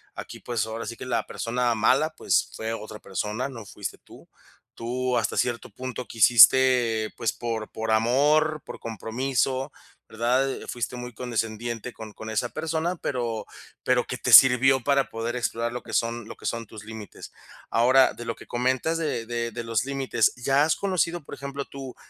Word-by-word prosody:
aquí, - - -8
pues, 120 -4 -2
ahora 110 0 -5
sí 115 - -6
que - - -7
la 125 - -1
persona 120 0 -1
mala, 130 +8 +3
pues, - - +1
fue 110 +1 -3
otra 110 -1 -7
persona, 105 +7 -3
no 115 -5 -9
fuiste 105 -2 -6
tú, - - -17 0.5
tú 125 +1 -1
hasta 110 -2 -1
cierto 120 -1 -1
punto 125 -1 -6
quisiste, 120 0 +5
pues, 115 - 0
por 115 -2 -4
por 110 0 -3
amor, 145 +7 +3
por - - -9
compromiso, 130 +4 -2 0.4
¿verdad? 125 +4 +1
Eh, - - -7
fuiste 120 0 -4
muy 125 0 -7
condescendiente 115 0 -3
con 110 -1 -9
con 110 - -8
esa 110 +2 -1
persona, 165 +3 -2
pero 120 -8 -3 0.4
pero 125 -1 +2
que 125 - -4
te 125 -1 0
sirvió 130 +1 +8
para 140 +1 +2
poder 115 +2 -3
explorar 115 -1 -1
lo 125 - -4
que - - -10
son 115 -1 -1
lo - - -8
que - - -14
son 115 0 -2
tus 110 0 -11
límites. 110 -1 -9 0.4
Ahora 130 +3 +5
de 120 - -9
lo 115 -1 -3
que - - -14
comentas 130 +6 0
de 150 -8 -2
de 115 0 -3
de 115 - -5
los 115 +1 0
límites, 135 -5 +1
¿ya 135 +3 +2
has 160 - +2
conocido, 175 -4 -1
por - - -9
ejemplo, 140 0 -5
tú, 135 -2 -9
120 Hz, 180 wpm, -25 LUFS, 115-130 Hz, 0.5 s, sirvió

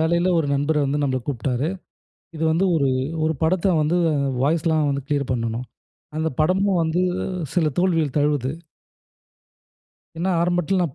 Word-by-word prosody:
வேலைல 170 +3 +2
ஒரு 160 - 0
நண்பர் 145 +2 +1
வந்து 140 +2 0
நம்மல 130 -2 0
கூப்ட்டாரு. 130 +2 -1 0.7
இது 160 - -2
வந்து 165 +4 +2
ஒரு 140 -4 +2 0.4
1 160 0 +1
படத்த 180 +3 +2
வந்து 155 +4 +1 0.5
வாய்ஸ்லாம் 155 0 +2
வந்து 140 -1 -3
கிளியர் 140 -3 -1
பண்ணனும். 115 0 -2 0.5
அந்த 160 +1 0
படமும் 185 +3 +2
வந்து 165 +2 0 0.5
சில 165 -4 +3
தோல்விகள் 165 -6 +1
தழுவுது. 145 -3 +1 1.7
ஏன்னா, 175 +4 -1
ஆரம்பட்ல 175 +1 +1
நான் 155 -7 -2
155 Hz, 135 wpm, -22 LUFS, 140-170 Hz, 1.7 s, சில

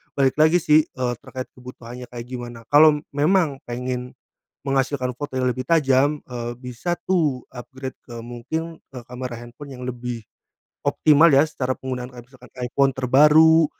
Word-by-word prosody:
balik 135 -2 +2
lagi 160 +3 +5
sih, 155 +1 +6
eee, 130 -6 -3
terkait 130 -1 -7
kebutuhannya 125 -1 -10
kayak 120 -1 -7
gimana? 120 -2 -7
Kalau 150 0 +7 0.2
memang 150 -2 +2
pengen 125 +1 -4 0.5
menghasilkan 135 -2 0
foto 145 0 -6
yang 130 0 +1
lebih 130 +1 -4
tajam, 145 -2 +3
eee, 120 -1 -5
bisa 125 +7 -3
tuh 155 -9 +1
upgrade 130 +1 -8
ke 120 - -11
mungkin, 140 +8 -5 0.2
eee, 125 - -7
kamera 125 -1 -6
handphone 120 +4 -11
yang 125 - -10
lebih 120 -2 -5 0.6
optimal 155 +1 +5
ya 135 +1 +6
secara 130 -4 -2
penggunaan. 125 -1 -5
Kaya 120 - -10
misalkan 125 -1 -18
iPhone 135 +2 +2
terbaru, 150 +5 +6
130 Hz, 150 wpm, -22 LUFS, 125-145 Hz, 0.6 s, Kalau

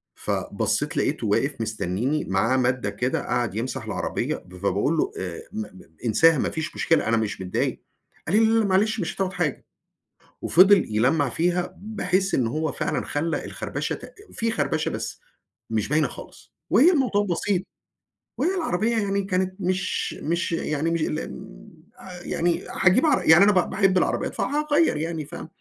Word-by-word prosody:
فَبصيت - - -2
لاقيته - - 0
واقف - - 0
مستنيني، 110 +7 -1
معاه 105 +7 +1
مادة 125 -4 +1
كده، 120 +6 -1
قعد 120 -4 -1
يمسَح 120 +3 -3
العربية - - -2
ب 90 0 -12
فباقول 100 - 0
له: - - +1
"آآ 90 -3 -5
م - - -5
م 95 -3 -10 0.2
انساها 150 +8 +5
ما - - 0
فيش 160 +1 -5
مشكلة، 165 -7 +2
أنا 115 0 +3
مش 110 -3 -2
متضايق." 90 -1 -2 0.4
قال 180 - +1
لي: 225 - +5
"لا 225 +1 +3
لا 220 - +2
معلش 205 +3 +2
مش 175 - -3
هتاخد 190 -1 -2
حاجة." 175 -7 -2 0.8
وفضل 190 +2 +6
يلّمع 135 +5 +2
فيها 175 +5 0
بحيث 195 -2 -1
إن 120 -3 +1
هو 155 +5 -1
فعلًا - - -2
خلّى 160 +3 -2
الخربشة - - -4
ت - - -12 0.2
في 230 0 -1
خربشة 160 -7 0
بس - - -5 0.5
مش 110 -2 -1
باينة 150 0 +2
خالص. - - -13 0.2
وهي 280 - +6
الموضوع 250 - +1
بسيط، 185 0 0 0.7
وهي 370 +3 +1
العربية 230 - 0
يعني 200 -1 0
كانت 185 -1 -1
مش 185 0 -1
مش 170 +3 -1
يعني 160 -1 -1
مش 165 -1 0
ال 155 0 -2
م - - -12 0.3
أ 180 -2 -10
يعني 170 0 0 0.2
هاجيب 190 - +5
عر 300 - +3
يعني 160 +4 +9
أنا 205 - +6
ب 185 -3 +2
باحب 195 -2 +2
العربيات، - - 0
فهاغيّر 300 - +1
يعني 160 -1 -3
فما 150 - -8
165 Hz, 170 wpm, -24 LUFS, 125-195 Hz, 0.8 s, يعني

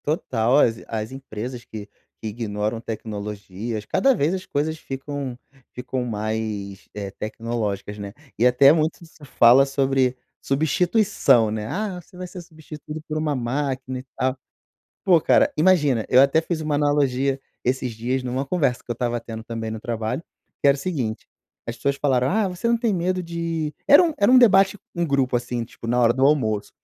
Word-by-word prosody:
Total. 130 -5 +1
As 115 -5 +3
as 110 0 -4
empresas 125 -2 -7
que 105 -2 -8 0.4
que - - -3
ignoram 105 0 -3
tecnologias 105 -1 -5
cada 270 - +2
vez 155 - +1
as 185 0 -4
coisas 155 +1 -2
ficam 135 -2 -5 0.4
ficam 125 0 -4
mais, 105 -3 -4
eh, 100 -1 -5
tecnológicas, 105 -1 -4
né. 100 -1 -7 0.2
E 115 - +3
até 125 +3 +7
muito 160 +2 0
se 160 -2 -15
fala 130 0 +6
sobre 135 -2 +1 0.2
substituição, 160 - +2
né. 105 0 -3
"Ah, 195 - -3
você 175 - -18
vai 180 0 -6
ser 180 0 -9
substituído 155 -1 -9
por 155 - -2
uma 155 -2 0
máquina 130 +1 -2
e 130 - -11
tal". 130 +1 0 0.7
Pô, 180 -3 +5
cara, - - +4
imagina, 150 - +3
eu 125 - +7
até 140 +4 +5
fiz 165 -1 -3
uma 155 -1 -1
analogia 140 -2 +1 0.2
esses 125 -1 -1
dias 125 +4 -2
numa 130 +2 -2
conversa 140 -5 0
que - - -14
eu - - +3
estava 120 0 -2
tendo, 115 -1 -8
também, 115 -1 -5
no 110 0 -5
trabalho, 115 +5 -3 0.4
que - - +4
era 140 - +6
o - - -11
seguinte. 135 -9 -3 0.4
As 115 - -5
pessoas 140 +2 -1
falaram: 130 -3 +1
"Ah, 210 +1 +1
você 185 +6 -3
não 235 - +3
tem 230 -2 0
medo 185 0 0
de" 165 -3 -3
era 285 +6 +9
um 335 -2 +1
era 205 +3 +4
um 260 - +7
debate 195 -4 +5 0.2
com 170 -1 0
grupo 135 -4 +1
assim, 120 -1 -3
tipo, 115 - -11
na 120 +2 +1
hora 120 -1 +5
do 130 +2 +1
almoço, 110 -8 +1
130 Hz, 180 wpm, -23 LUFS, 115-155 Hz, 0.7 s, era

